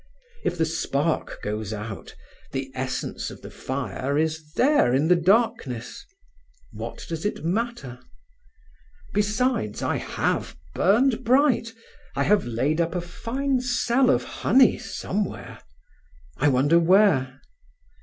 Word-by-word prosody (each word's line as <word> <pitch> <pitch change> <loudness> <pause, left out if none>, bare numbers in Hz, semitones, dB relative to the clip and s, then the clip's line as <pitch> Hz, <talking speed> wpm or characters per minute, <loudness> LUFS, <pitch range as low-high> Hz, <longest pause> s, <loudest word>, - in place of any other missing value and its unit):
If 175 - -1
the 165 - +2
spark 160 -1 -2
goes 105 0 -3
out, 105 -1 -7 0.4
the 135 -1 -3
essence 130 0 -3
of - - -12
the - - -9
fire 135 +1 -3
is 155 -1 -1
there 255 - +3
in 150 +5 +2
the 180 - +7
darkness. 170 - 0 0.7
What - - -7
does 165 -1 -5
it 205 -6 -3
matter? 185 - -2 1.1
Besides, 210 - 0
I - - 0
have - - -2 0.2
burned 230 +6 +3
bright; 255 -2 +3 0.4
I - - +1
have 205 -6 +2
laid 135 +8 0
up 170 +2 -1
a 180 - 0
fine 255 +9 -2
cell 250 +1 +2
of - - +3
honey 260 -4 +3
somewhere—I 75 - -6
wonder 145 +5 +4
where? 165 -8 +3
165 Hz, 120 wpm, -24 LUFS, -, 1.1 s, the